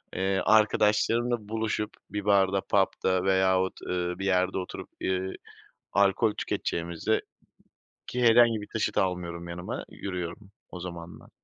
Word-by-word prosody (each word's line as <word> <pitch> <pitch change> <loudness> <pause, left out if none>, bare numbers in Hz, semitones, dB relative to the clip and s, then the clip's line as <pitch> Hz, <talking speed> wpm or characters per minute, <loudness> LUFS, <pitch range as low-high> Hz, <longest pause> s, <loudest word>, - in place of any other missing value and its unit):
Eee, 95 +1 +1
arkadaşlarımla 110 +1 +3
buluşup 110 -1 -2 0.2
bir 105 -1 -4
barda, 100 -1 +3
pub'da 95 -2 +1
veyahut, 95 -1 +2
ııı, 90 0 -2
bir 95 - -3
yerde 95 -1 +2
oturup, 90 -1 -6
ııı, 95 0 -1 0.6
alkol 100 +3 +3
tüketeceğimize, 85 +5 -1 0.9
ki 125 - -2
herhangi 115 -1 +6
bir - - -7
taşıt 110 - -1
almıyorum 85 -2 -2
yanıma, 90 +1 -5
yürüyorum 95 +1 -6 0.2
o 90 - -8
zamanlar. 85 -1 -9
95 Hz, 120 wpm, -28 LUFS, 90-105 Hz, 0.9 s, herhangi